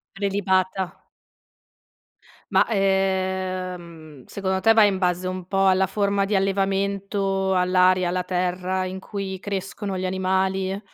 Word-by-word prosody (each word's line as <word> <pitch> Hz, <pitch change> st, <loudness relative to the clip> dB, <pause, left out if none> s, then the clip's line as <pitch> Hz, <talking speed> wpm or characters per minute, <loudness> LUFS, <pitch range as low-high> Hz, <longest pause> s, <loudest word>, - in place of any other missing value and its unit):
Prelibata. 190 Hz, -2 st, -1 dB, 1.5 s
Ma, -, -, +5 dB
ehm, 185 Hz, -, -2 dB
secondo 190 Hz, -1 st, -2 dB
te 225 Hz, +3 st, +5 dB
va 225 Hz, -1 st, +6 dB
in 200 Hz, -2 st, +2 dB
base 180 Hz, 0 st, 0 dB
un 185 Hz, -1 st, -5 dB
po' 195 Hz, 0 st, +1 dB
alla 190 Hz, 0 st, +4 dB
forma 200 Hz, 0 st, 0 dB
di 205 Hz, +1 st, -1 dB
allevamento, 195 Hz, 0 st, 0 dB
all'aria, 185 Hz, 0 st, +3 dB
alla 180 Hz, +1 st, -1 dB
terra 180 Hz, +1 st, -1 dB
in 185 Hz, +1 st, -5 dB
cui 190 Hz, -1 st, -5 dB
crescono 195 Hz, 0 st, -4 dB
gli 185 Hz, -, -3 dB
animali? 190 Hz, +1 st, 0 dB
190 Hz, 120 wpm, -23 LUFS, 185-195 Hz, 1.5 s, va